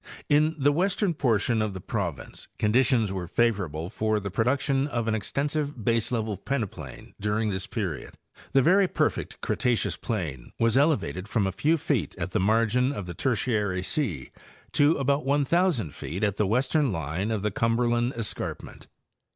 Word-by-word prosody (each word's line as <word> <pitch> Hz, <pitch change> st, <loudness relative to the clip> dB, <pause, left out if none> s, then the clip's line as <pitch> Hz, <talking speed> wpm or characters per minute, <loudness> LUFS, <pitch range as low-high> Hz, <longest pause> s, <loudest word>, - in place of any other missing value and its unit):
—In 155 Hz, +2 st, +3 dB
the 145 Hz, 0 st, +3 dB
western 185 Hz, +3 st, +1 dB
portion 115 Hz, -5 st, +1 dB
of 110 Hz, -2 st, -1 dB
the -, -, -5 dB
province 90 Hz, -, -4 dB
con 105 Hz, 0 st, +1 dB
ditions 125 Hz, -5 st, +3 dB
were 95 Hz, -3 st, -4 dB
favorable 95 Hz, -7 st, 0 dB
for 110 Hz, +1 st, 0 dB
the 100 Hz, -1 st, -5 dB
production 135 Hz, +5 st, +1 dB
of 120 Hz, -6 st, -2 dB
an 110 Hz, -, +1 dB
extensive 140 Hz, +3 st, -2 dB
base 115 Hz, -1 st, +1 dB
level 110 Hz, -4 st, -1 dB
peneplain 100 Hz, -, -5 dB
during 105 Hz, +1 st, 0 dB
this 95 Hz, -1 st, -3 dB
period. 100 Hz, -8 st, -4 dB, 0.4 s
The 135 Hz, -1 st, +5 dB
very 190 Hz, +4 st, +5 dB
perfect -, -, -1 dB
Cretaceous 110 Hz, -8 st, 0 dB
plain 80 Hz, -, -4 dB
was 115 Hz, 0 st, +2 dB
elevated 135 Hz, -, +1 dB
from 105 Hz, -2 st, +1 dB
a 95 Hz, -, 0 dB
few 155 Hz, -, +2 dB
feet 130 Hz, -, -1 dB
at 90 Hz, 0 st, -4 dB
the -, -, +1 dB
margin 115 Hz, +6 st, +2 dB
of 105 Hz, -9 st, -5 dB
the 85 Hz, -, -6 dB
Tertiary 105 Hz, -3 st, 0 dB
sea 100 Hz, -, -2 dB, 0.4 s
to 145 Hz, +3 st, +4 dB
about 140 Hz, +1 st, +1 dB
1,000 145 Hz, -, +1 dB
feet 95 Hz, +7 st, -5 dB
at 100 Hz, -2 st, +1 dB
the 105 Hz, -, +2 dB
western 130 Hz, +5 st, +2 dB
line 85 Hz, +4 st, -2 dB
of 110 Hz, -3 st, -1 dB
the 105 Hz, -, 0 dB
Cumberland 120 Hz, +3 st, +1 dB
escarpment. 115 Hz, -3 st, -4 dB
115 Hz, 165 wpm, -26 LUFS, 100-135 Hz, 0.4 s, The